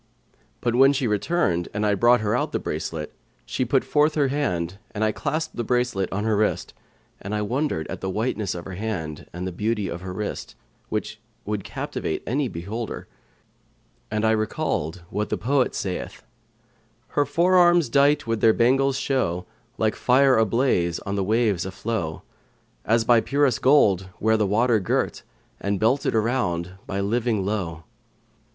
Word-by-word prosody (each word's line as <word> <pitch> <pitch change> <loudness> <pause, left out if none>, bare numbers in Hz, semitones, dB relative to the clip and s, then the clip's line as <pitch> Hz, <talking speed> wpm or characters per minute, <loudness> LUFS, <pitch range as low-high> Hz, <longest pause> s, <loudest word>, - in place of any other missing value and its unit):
But 120 - 0
when 135 +3 +6
she 135 -1 -1
returned 105 - 0
and 105 +1 0
I 105 - +3
brought 120 +3 +4
her 105 +1 0
out 125 - -1
the - - +2
bracelet, - - -4 0.3
she - - -1
put 130 +2 +2
forth 150 +1 +2
her 145 -3 +2
hand 95 - -2 0.2
and 105 - 0
I 110 - +3
clasped 155 +6 -3
the 120 - -1
bracelet 120 -5 0
on 105 +2 -2
her 110 -1 +1
wrist; 105 +1 0 0.5
and 100 +2 -4
I 105 - 0
wondered 120 - -1
at - - -6
the 95 - -2
whiteness 105 -1 -1
of 85 - -7
her 95 - -7
hand 90 -7 -4
and 90 +2 -5
the 95 - -3
beauty 105 +2 -1
of 85 - -5
her 95 0 -6
wrist, 105 +3 -5 0.3
which 105 0 -3 0.3
would 105 -1 -2
captivate - - -4
any 135 +3 0
beholder; 105 +5 -5 1.0
and 110 +1 0
I 110 - +4
recalled 90 -6 -1
what 105 +2 -2
the - - -1
poet 130 +3 +1
saith, 90 -2 -4 0.9
Her 145 - +2
fore 170 +6 +2
arms, 175 -3 +5
dight 145 +3 +3
with 115 -1 -1
their 110 - +6
bangles, 135 +3 +3
show 90 -12 -1 0.2
* 120 0 -38
Like 110 -1 +1
fire 130 +1 +4
ablaze 110 -6 +2
on 100 - -4
the 100 -1 0
waves 105 -3 +1
a 95 - -4
flow; 95 -4 -3 0.6
As 115 +1 +3
by 120 -1 +5
purest 140 -4 +1
gold 105 -10 +4
were 110 +1 +3
the 105 -2 +1
water 115 +3 +3
girt, 95 - -1 0.2
* - - -38
And 100 -1 -1
belted 120 +4 +2
around 105 -7 0 0.2
by 95 - -3
a 100 - 0
living 110 -1 0
lowe.' 90 -6 -3
110 Hz, 175 wpm, -24 LUFS, 95-130 Hz, 1.0 s, when